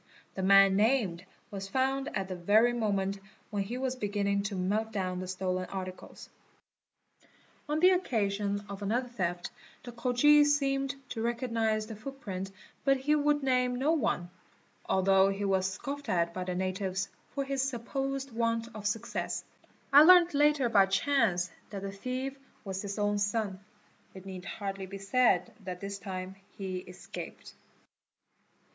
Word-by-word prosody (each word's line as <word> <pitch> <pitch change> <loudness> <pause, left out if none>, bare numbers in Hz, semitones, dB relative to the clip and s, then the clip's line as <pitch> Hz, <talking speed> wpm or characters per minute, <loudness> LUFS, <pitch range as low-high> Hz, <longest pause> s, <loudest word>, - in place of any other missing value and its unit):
The 190 - -4
man 195 0 +6
named 205 -5 +2 0.3
was 195 -1 -5
found 270 +5 0
at 195 -1 -2
the 185 - -4
very 215 +7 +4
moment 200 -4 0 0.3
when 205 -2 -1
he 220 +6 -4
was 260 0 -1
beginning 200 -3 0
to 200 - -5
melt 210 +4 -1
down 185 -3 -2
the 185 - -5
stolen 185 0 -2
articles. 185 -1 -7 1.4
On 300 +1 +1
the 365 +3 +7
occasion 205 - 0
of 200 0 -7
another 240 +5 -1
theft 175 -6 -3 0.3
the 245 - -8
Khoji 250 +5 +5
seemed 275 -2 +1
to 225 - -4
recognise 230 -2 0
the 220 0 -8
footprint 205 -6 -6 0.3
but 275 -1 +4
he 275 +3 +1
would 295 -1 +2
name 250 -1 +2
no 270 +5 +1
one, 220 - 0 0.6
al 190 - +2
though 195 0 +5
he 195 +1 -2
was 190 -1 +1
scoffed 280 +8 -6
at 170 -1 +1
by 185 0 -4
the 180 -1 -3
natives 190 +1 -2 0.3
for 280 - 0
his 270 -1 -1
supposed 270 +1 -3
want 230 0 -1
of 210 -1 -4
success. 205 +1 -2 0.5
I 285 - +10
learnt 350 +1 +7
later 290 -2 +4
by 200 -4 +5
chance 195 -5 +1 0.2
that 200 -2 -6
the 195 - -4
thief 255 +6 -4 0.3
was 190 -1 -3
his 200 0 -5
own 205 0 +1
son: 205 -2 -1 0.6
it 190 0 -10
need 185 -1 -7
hardly 195 -2 -5
be 195 +1 -7
said 195 -1 +2
that 180 -1 -5
this 200 +1 -5
time 185 0 -6 0.2
he 190 -2 -3
escaped. 180 0 -9
205 Hz, 155 wpm, -30 LUFS, 190-255 Hz, 1.4 s, I